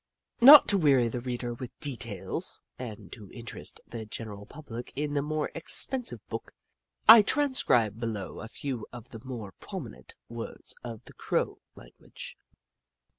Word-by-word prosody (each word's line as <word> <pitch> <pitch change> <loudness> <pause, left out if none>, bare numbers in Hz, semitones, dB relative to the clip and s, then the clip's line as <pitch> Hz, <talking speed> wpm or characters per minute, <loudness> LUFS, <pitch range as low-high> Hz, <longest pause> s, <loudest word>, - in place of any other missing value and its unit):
Not 285 +4 +11
to 200 - +4
weary 135 -7 +4
the 120 +1 -4
reader 120 -1 -3
with 120 +1 -9
details, 115 -8 -4 0.2
and 105 -7 -8
to 105 -4 -9
interest 120 -2 -9
the 115 -1 -7
general 105 -1 -7
public 125 -6 -9
in 145 +1 -2
the 145 - +1
more 155 +1 -2
expen 250 +10 0
sive - - -8
book, - - -6 0.5
I 225 0 +12
transcribe 200 - +2
below 110 -4 -4
a 110 - -7
few 125 -1 -5
of 120 -1 -11
the 115 - -10
more 120 -7 -7
prominent 60 0 -8
words 115 -1 -6
of 115 -3 -7
the - - -12
Crow - - -1 0.2
language. - - -12
120 Hz, 150 wpm, -29 LUFS, 110-145 Hz, 0.5 s, I